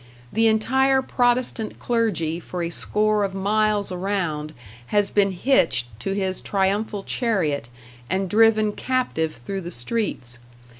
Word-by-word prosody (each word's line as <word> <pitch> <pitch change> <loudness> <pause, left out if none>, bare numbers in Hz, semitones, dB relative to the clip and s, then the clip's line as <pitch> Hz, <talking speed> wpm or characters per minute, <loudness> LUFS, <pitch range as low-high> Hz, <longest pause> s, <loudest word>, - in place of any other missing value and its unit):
The 225 +1 +3
entire 265 +5 +3
Protestant 245 -3 0
clergy 180 -9 0
for 175 0 -5
a 170 - -3
score 210 +3 +1
of 195 -1 -2
miles 205 +1 +1
around 175 -5 -2 0.3
has 205 +3 +1
been 200 -1 +3
hitched 185 - +2
to 195 - -2
his 190 -1 -1
triumphal 200 +1 -1
chariot, 165 - -1 0.4
and 190 +1 0
driven 215 +1 +4
captive 210 -11 -1
through 190 +12 -5
the 175 - -6
streets. 125 - -2
200 Hz, 130 wpm, -23 LUFS, 175-220 Hz, 0.4 s, driven